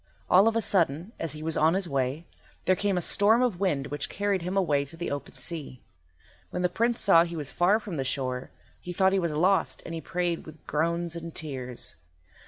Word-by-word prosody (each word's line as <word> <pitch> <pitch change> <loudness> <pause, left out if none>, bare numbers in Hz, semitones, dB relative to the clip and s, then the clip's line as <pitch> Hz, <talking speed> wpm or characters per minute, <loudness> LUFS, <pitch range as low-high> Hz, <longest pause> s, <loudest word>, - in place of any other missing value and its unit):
All 190 +4 +7
of 225 - +2
a 230 - +2
sudden, 170 -2 +1
as 165 -3 -2
he 155 0 -8
was 160 0 -1
on 160 +3 +3
his 190 -2 -1
way, 140 +2 -1 0.4
there 185 - +4
came 200 0 0
on - - 0
a - - +1
storm 220 +8 +4
of 225 -8 0
wind 150 -9 0
which 145 0 -2
carried 200 -2 -1
him 180 +3 -3
away 150 -7 +2
to 140 +4 -11
the 175 - -4
open 145 -1 -6
sea. 155 -7 -2 0.7
When 180 - -3
the 180 - +3
Prince 235 +6 0
saw 170 -5 +6
he 170 0 -5
was 150 -4 -2
far 185 +5 +3
from 200 -7 -6
the 135 - -1
shore 130 -1 -2 0.3
he 180 - -7
thought 190 +1 +3
he 195 - +3
was 170 -3 -1
lost, 185 +5 +2
and 165 - -6
he 165 - -4
prayed 175 -1 -2
with 155 -1 -13
groans 170 +2 -1
and 170 -1 -7
tears. 130 - -3
170 Hz, 225 wpm, -27 LUFS, 150-190 Hz, 0.7 s, All